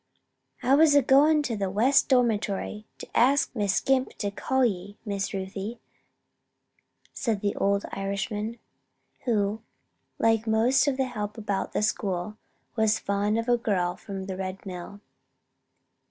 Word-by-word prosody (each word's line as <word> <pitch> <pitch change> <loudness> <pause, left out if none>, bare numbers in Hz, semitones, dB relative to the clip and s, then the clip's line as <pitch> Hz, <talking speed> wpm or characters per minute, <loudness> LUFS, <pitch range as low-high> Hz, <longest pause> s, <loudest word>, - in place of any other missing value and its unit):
"I 265 - +3
was 300 0 +6
a 285 - +6
goin' 295 +4 +5
to 245 -5 -2
the 195 -2 -2
West 235 +8 +3
Dormitory 215 -4 0
to - - -9
ax 275 +4 +4
Miss 205 -5 0
Scrimp 265 -1 +1
for - - -35
to 205 -2 -2
call 265 +5 +1
ye, 200 -2 -3
Miss 200 -2 -2
Ruthie," 195 +4 -5 1.3
said 225 -6 -1
the 205 -1 -1
old 200 0 +1
Irishman, 205 +3 -3 0.7
who 215 -2 0 0.6
like 225 0 +2
most 230 +6 +3
of 270 -2 +1
the 265 - +1
help 210 -4 -5
about 205 -3 -3
the - - 0
school 200 -1 -2 0.4
was 220 -1 +3
fond 205 +2 0
of 230 - -1
the 240 -1 +2
girl 180 -6 0
from 195 -1 -7
the 190 0 -5
Red 190 +1 -5
Mill. 185 +2 -8
210 Hz, 150 wpm, -26 LUFS, 200-240 Hz, 1.3 s, was